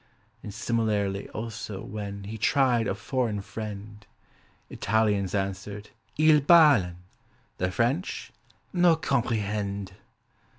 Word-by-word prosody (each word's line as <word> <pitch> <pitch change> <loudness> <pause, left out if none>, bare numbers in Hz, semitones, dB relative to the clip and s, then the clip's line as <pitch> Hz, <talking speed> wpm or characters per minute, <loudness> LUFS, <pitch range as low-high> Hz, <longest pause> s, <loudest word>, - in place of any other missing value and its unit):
And, - - -7
similarly, 105 -3 -1
also, 110 -3 -6
when 100 -1 -6
He 105 +3 -6
tried 125 -2 +3
a - - -1
foreign 115 -2 -1
friend; 105 0 -7 0.6
Italians 105 -3 0
answered, 100 +1 -4 0.3
"Il 155 0 +6
balen" 140 - +6 0.6
The 90 - +1
French, 120 - -1 0.4
"No 175 -2 +5
comprehend." 105 - -1
105 Hz, 95 wpm, -27 LUFS, 100-120 Hz, 0.6 s, Il